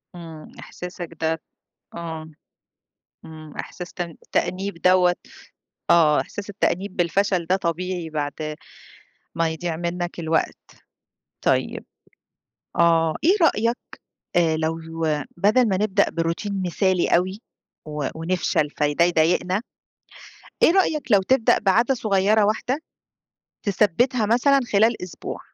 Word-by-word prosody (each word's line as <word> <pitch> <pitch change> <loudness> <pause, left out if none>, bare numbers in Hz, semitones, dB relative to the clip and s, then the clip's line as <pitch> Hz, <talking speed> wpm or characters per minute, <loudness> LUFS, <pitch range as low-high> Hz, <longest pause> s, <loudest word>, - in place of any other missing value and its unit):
إمم، 165 -3 -10
إحساسك 180 -1 -8
ده 160 0 0 0.5
آه، 160 -2 -6 1.0
إمم، 155 -2 -11
إحساس 180 -1 -7
تأن 170 -3 -5
تأنيب 190 -2 -1
دوّة 180 -1 +4 0.8
آه 155 -3 +5
أحساس 205 0 -6
التأنيب 195 -1 -1
بالفشل 180 0 +1
ده 185 +2 +3
طبيعي 175 -1 -3
بعد 145 -2 -2 1.0
ما 165 -1 +1
يضِيع 160 0 -3
منك 175 0 -3
الوقت، 160 0 0 0.9
طيب - - 0 0.9
آه. 165 -2 +3
إيه 370 +5 +5
رأيك 235 -6 +3 0.6
آآ 165 -2 +3
لو 160 +1 -1 0.6
بدَل 215 +6 +3
ما 190 - +1
نبدأ 205 -2 +3
بroutine 185 +4 -2
مثالي 185 0 +1
أوي 185 +4 -1 0.5
و 150 -2 -3
ونفشَل 160 -3 0
فده 150 +3 +1
يضايقنا. 175 +4 +2 1.0
إيه - - +7
رأيك 305 - +1
لو 195 - +6
تبدأ 245 +3 +3
بعادة 230 +6 +3
صغيّرة 210 -2 +2
واحدة 220 +6 0 0.9
تثبِّتها 210 +4 +2
مثلًا 270 +5 +4
خلال 220 +1 +3
أسبوع؟ 180 - -7
180 Hz, 110 wpm, -23 LUFS, 165-205 Hz, 1.0 s, إيه